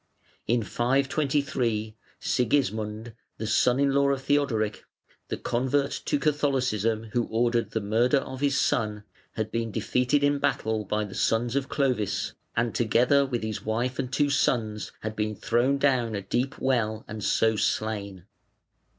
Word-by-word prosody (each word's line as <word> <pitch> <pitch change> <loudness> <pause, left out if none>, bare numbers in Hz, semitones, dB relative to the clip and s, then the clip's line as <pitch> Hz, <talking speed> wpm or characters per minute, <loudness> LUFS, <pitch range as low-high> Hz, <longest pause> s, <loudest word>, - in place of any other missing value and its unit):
In 120 0 +2
523 130 - 0 0.2
Sigismund, 110 -3 0 0.2
the 110 - -4
son 125 +4 +3
in 140 -1 +3
law 140 0 +3
of 135 -1 -1
Theodoric, 125 -8 0 0.4
the - - -3
convert 130 +3 0
to - - +1
Catholicism 130 -7 0
who 120 -1 +1
ordered 115 -1 +1
the 110 - -2
murder 115 +7 +2
of 130 0 -4
his 140 -1 +2
son, 105 -3 0 0.3
had 110 0 -3
been 115 0 -1
defeated 125 +6 +1
in 145 0 +3
battle 110 -4 0
by 105 +2 -1
the 100 - -9
sons 115 +2 +1
of 140 -1 -1
Clovis, 125 -8 0 0.2
and 115 -1 0
together 125 +5 +3
with 120 -4 -2
his 110 -1 -4
wife 120 +4 -1
and 130 -2 -2
two 145 0 +2
sons 110 -6 0
had 110 0 -4
been 105 0 -1
thrown 125 +6 +1
down 130 -5 +1
a 100 - -4
deep 125 +8 -1
well 110 -4 0
and 105 -1 -6
so 110 +2 +2
slain. 100 -4 -2
120 Hz, 150 wpm, -27 LUFS, 110-135 Hz, 0.4 s, son